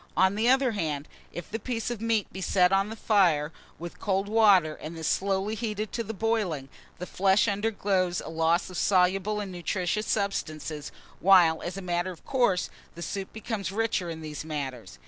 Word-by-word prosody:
On 190 +1 +4
the 220 +4 +2
other 265 -1 +4
hand, 155 -8 -3 0.2
if 175 - -8
the 225 - -3
piece 230 0 -3
of 230 -3 -5
meat 225 -3 +1
be 190 - -6
set 180 -1 +3
on 195 +1 +2
the 220 - -6
fire 175 -9 +2 0.3
with 170 +1 -8
cold 195 0 0
water, 205 -7 +5
and 160 +2 -8
this 160 -1 -3
slowly 195 +3 0
heated 215 -1 -3
to 230 - -2
boiling, 210 -10 -1 0.3
the 180 - -5
flesh 195 +4 +2
undergoes 200 -4 0
a - - -7
loss 165 +2 +1
of 180 - -6
soluble 195 +2 +2
and 200 -2 -5
nutritious 180 +4 -2
substances, 155 -7 -2 0.3
while, 175 -4 +5
as 175 +2 -5
a 195 - -6
matter 175 0 -1
of 175 -3 -11
course, 240 -9 +1 0.2
the 170 - -6
soup 195 +1 -5
becomes 215 -4 -4
richer 210 -4 -1
in 160 -1 -6
these 155 -1 -6
matters. 135 - -5
190 Hz, 185 wpm, -27 LUFS, 170-210 Hz, 0.3 s, water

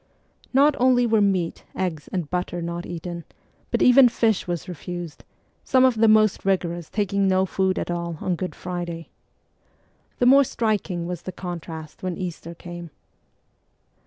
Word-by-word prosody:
Not 285 +3 +5
only 250 -1 +4
were 220 -2 +3
meat, 190 -4 0
eggs, 170 -5 -3
and 180 -5 -2
butter 180 +1 -3
not 170 +1 -4
eaten, 170 0 -6 0.5
but - - +1
even 250 0 +7
fish 225 -5 +1
was 175 0 -3
refused; 175 -1 -7 0.4
some 260 -1 +4
of 260 - +4
the 225 +1 +5
most 215 -1 +4
rigorous 175 -4 -1
taking 200 -1 0
no 190 0 +3
food 190 0 0
at - - -2
all 170 -1 -3
on 185 - -1
Good 180 +2 -5
Friday. 175 -2 -5 1.1
The 245 - +2
more 275 +3 +7
striking 210 -8 -1
was 175 -1 -5
the 185 - -6
contrast 165 -4 -7
when 185 -2 -3
Easter 170 -2 -6
came. 175 0 -9
180 Hz, 155 wpm, -24 LUFS, 170-215 Hz, 1.1 s, even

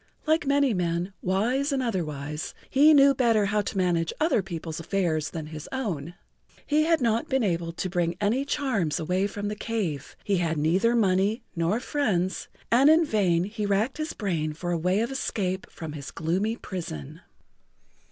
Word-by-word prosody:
Like 315 -2 +2
many 280 -3 +3
men, 175 0 -1
wise 240 +10 +1
and 270 -2 0
otherwise, 150 - -3 0.2
he 290 +3 +6
knew 280 -2 +7
better 230 -5 +3
how 210 +1 +1
to 200 - -5
manage 170 -3 +1
other 305 -8 +3
people's 170 -3 -6
affairs 165 -4 -1
than 160 0 -5
his 155 0 -8
own.[Pg 175 - -3 0.4
53] - - -27
He 310 - +5
had 325 -2 +2
not 230 -1 +1
been 265 -2 +2
able 170 -4 -1
to 185 - -3
bring 175 -1 -1
any 220 +6 +1
charms 260 - -1
away 180 +5 0
from 205 0 -5
the 210 - -3
cave, 200 - -3
he 200 -2 +1
had 165 -2 0
neither 185 +10 +2
money 205 +2 +2
nor 170 +6 +1
friends, 205 -10 -1 0.2
and 260 +5 +6
in 320 +1 +5
vain 185 - +2
he 210 +1 -3
racked 215 +9 0
his 310 +1 -3
brain 165 -7 -2
for 175 +3 -4
a - - +1
way 180 +5 +1
of 235 - -1
escape 195 -8 -2
from 160 -2 -7
his 140 -2 -7
gloomy 185 +8 -1
prison. 165 - -7
195 Hz, 180 wpm, -26 LUFS, 170-235 Hz, 0.4 s, knew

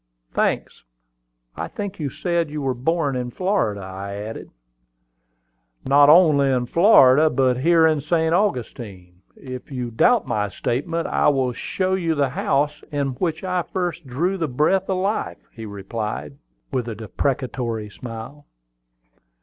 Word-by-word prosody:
"Thanks. - - -1 0.7
I - - -4
think 200 -2 -6
you 145 -3 -2
said 170 +2 -1
you 150 +1 -5
were 135 -1 0
born 145 +2 0
in 125 -1 -3
Florida," 180 - -1
I 95 +1 -7
added. 105 +2 -7 1.4
"Not 145 +2 +6
only 150 -4 +6
in 125 -2 +1
Florida, 155 - +6
but 130 -4 +2
here 165 +3 +4
in 155 -2 +2
St. 160 +2 +1
Augustine. 110 - -3
If 130 0 -9
you 125 -3 -4
doubt 240 - +3
my 105 -5 -1
statement, 145 - -2
I - - +1
will 130 -3 +2
show 185 +9 -2
you 170 -4 0
the 140 -2 +1
house 145 +3 0
in 140 -2 -1
which 160 +6 -3
I 180 -1 0
first 175 -3 -4
drew 175 +10 -1
the 165 - 0
breath 155 +9 +1
of 190 - +1
life," 195 +4 -2
he 115 -2 -8
replied, 100 - -5 0.4
with 125 -3 -2
a 115 - -4
deprecatory 115 -1 -3
smile. 120 +6 -9
140 Hz, 145 wpm, -22 LUFS, 120-165 Hz, 1.4 s, Not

